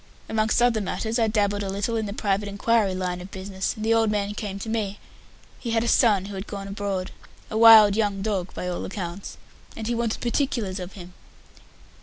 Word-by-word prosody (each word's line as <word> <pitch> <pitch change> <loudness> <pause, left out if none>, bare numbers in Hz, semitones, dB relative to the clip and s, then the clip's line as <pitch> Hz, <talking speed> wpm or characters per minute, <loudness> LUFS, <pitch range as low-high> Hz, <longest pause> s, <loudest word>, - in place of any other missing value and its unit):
"Amongst 220 +2 +1
other 235 -3 +3
matters, 220 +4 -2
I 225 - +3
dabbled 205 -2 +1
a 195 - -3
little 200 +4 -2
in 220 -2 -1
the - - -5
Private 200 -1 -1
Inquiry 200 -1 +1
line 180 -1 -3
of 180 - -9
business, 190 +1 -4
and 215 -1 -5
the 225 - +3
old 225 -1 +3
man 205 -1 -1
came 205 -2 -5
to 200 - -7
me. 215 -3 -2 0.6
He 240 - -5
had 225 0 +1
a - - -2
son 210 -6 +4
who 200 - -7
had 195 +2 -6
gone 200 -1 -6
abroad 195 -2 -3 0.4
a - - -4
wild 220 -3 +9
young 205 -3 0
dog, 195 -4 -2
by 180 - -4
all 180 -1 -3
accounts 185 -1 -6 0.4
and 220 - -5
he 240 - -1
wanted 230 -1 -1
particulars 235 -6 -1
of 180 +1 -7
him." 180 -2 -11
205 Hz, 210 wpm, -25 LUFS, 195-225 Hz, 0.6 s, wild